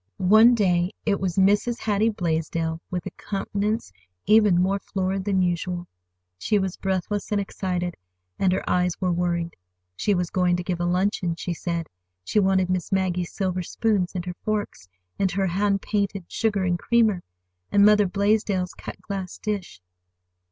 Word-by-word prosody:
One 220 +6 +6
day 180 -3 +1
it 200 -2 +1
was 185 -3 -2
Mrs. 205 +5 +3
Hattie 215 -1 +1
Blaisdell, 165 -3 -2
with 180 -1 -3
a - - -5
countenance 205 - -3 0.3
even 210 -5 +5
more 195 +2 +1
florid 190 0 -2
than 190 -2 +2
usual. 175 0 -2 0.5
She 210 - +1
was 190 -2 -1
breathless 195 +2 -2
and 205 - +2
excited, 180 -3 -2 0.5
and 190 - +3
her 185 - -1
eyes 180 -1 +1
were 185 -1 +1
worried. 170 -1 -1 0.4
She 205 - +1
was 180 -2 -1
going 180 -2 +2
to 180 - -3
give 175 -1 -2
a 175 - 0
luncheon, 180 -1 0
she 175 +1 -3
said. 170 -1 -3 0.4
She 210 - +1
wanted 190 -2 +3
Miss 185 +1 -2
Maggie's 180 -2 0
silver 185 -2 -1
spoons, 195 0 0
and 180 -1 -3
her 180 - -4
forks, 205 - -3 0.3
and 195 - +2
her 195 +1 +1
hand 195 +2 0
painted 200 -3 -1
sugar 205 -4 0
and 175 -1 0
creamer, 220 -5 +2 0.5
and 200 0 +6
Mother 210 -1 +5
Blaisdell's 200 -1 +1
cut - - -9
glass 195 -3 -5
dish. 205 - -4
190 Hz, 165 wpm, -24 LUFS, 180-205 Hz, 0.5 s, One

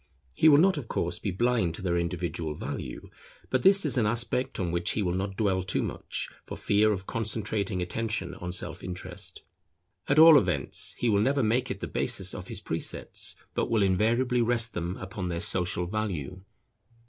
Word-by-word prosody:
He 155 - +5
will 145 - +7
not 185 +2 +4
of 135 -6 -5
course 85 -3 -1
be - - -3
blind 110 -3 +1
to 95 - -9
their 90 -2 0
individual 85 -2 -2
value; 65 -3 -6 0.4
but 130 - +2
this 195 +2 +6
is 135 -4 +3
an 110 - +2
aspect 120 +3 0
on 90 -3 -1
which 85 0 -1
he 105 - -1
will 90 -2 0
not 95 +1 -3
dwell 95 -4 +1
too 95 +1 -1
much, - - -3 0.2
for - - -8
fear 105 +1 +3
of 95 -2 -3
concentrating 105 -4 -1
attention 110 +4 -2
on 90 0 -6
self 90 - -2
interest. 90 -1 -6 0.7
At 140 - +3
all 160 -1 +9
events, - - -1
he 120 - -1
will 100 -3 +3
never 135 +4 +2
make 120 +4 +1
it 100 - -5
the - - -3
basis - - -1
of - - -7
his - - -5
precepts, - - -3 0.2
but - - -1
will 110 -3 +2
invariably 120 +6 +2
rest 115 -1 +1
them 85 +2 -3
upon 95 -1 -5
their 85 -1 -2
social 90 -2 0
value. 95 -4 -4
105 Hz, 190 wpm, -28 LUFS, 90-120 Hz, 0.7 s, all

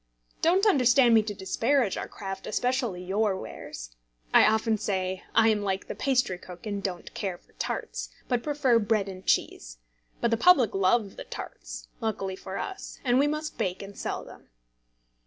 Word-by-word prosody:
Don't 370 +5 +4
understand 255 - +5
me 225 - +7
to 210 -1 -5
disparage 225 +4 +1
our - - -4
craft, 195 -1 -7
especially 245 -6 -1
your 195 +1 +1
wares. - - -8 0.4
I - - +8
often 220 0 +2
say 185 -2 -1
I 225 0 +6
am 215 -1 +2
like 195 -1 -2
the - - -4
pastrycook, 185 -9 -1
and 205 -2 -3
don't 180 -3 -5
care 190 -3 -3
for - - -29
tarts, - - -3 0.2
but 245 -2 +1
prefer 280 -5 +2
bread 210 -2 +1
and 190 -1 -8
cheese; - - 0 0.4
but 235 - +1
the 230 - +3
public 265 - +5
love 195 +2 +2
the - - -6
tarts - - -8
(luckily 195 -5 -2
for 190 0 -7
us), 390 -1 -6
and 245 0 +4
we 285 - +4
must 305 +1 -3
bake 185 +1 -1
and 195 0 -10
sell - - -4
them. - - -14
215 Hz, 175 wpm, -27 LUFS, 190-250 Hz, 0.4 s, I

